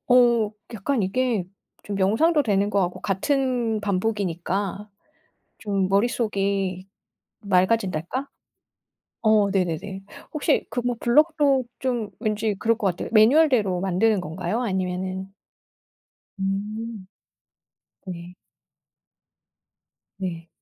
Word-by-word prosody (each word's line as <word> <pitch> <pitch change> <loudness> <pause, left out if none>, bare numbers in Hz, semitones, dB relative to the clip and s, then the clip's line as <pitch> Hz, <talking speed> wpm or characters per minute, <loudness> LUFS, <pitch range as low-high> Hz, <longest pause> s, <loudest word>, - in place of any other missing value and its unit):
어 240 -4 +5 0.2
약간 225 +2 -1
이게 225 0 0 0.4
좀 200 -1 -4
명상도 290 - +3
되는 205 -2 +1
것 200 - +2
같고 175 0 -3
같은 240 +1 0
반복이니까 200 -1 -2 0.7
좀 195 -3 -1
머릿속이 195 -3 0 0.5
맑아진달까. 195 - 0 0.9
어 215 -2 +4
네네네. 190 +1 -2 0.3
혹시 305 -1 +1
그 245 - -2
뭐 245 0 -1
블록도 285 0 +3
좀 240 -5 -1
왠지 215 -1 -1
그럴 230 0 +2
것 205 - 0
같아요. 180 -2 -3
매뉴얼대로 225 - +4
만드는 195 +2 +2
건가요? 185 +8 -3
아니면은 190 -2 -2 1.1
음. 205 +2 -4 1.0
네. 175 0 -7 1.8
네. 175 -3 -5
205 Hz, 200 characters per minute, -24 LUFS, 190-235 Hz, 1.8 s, 어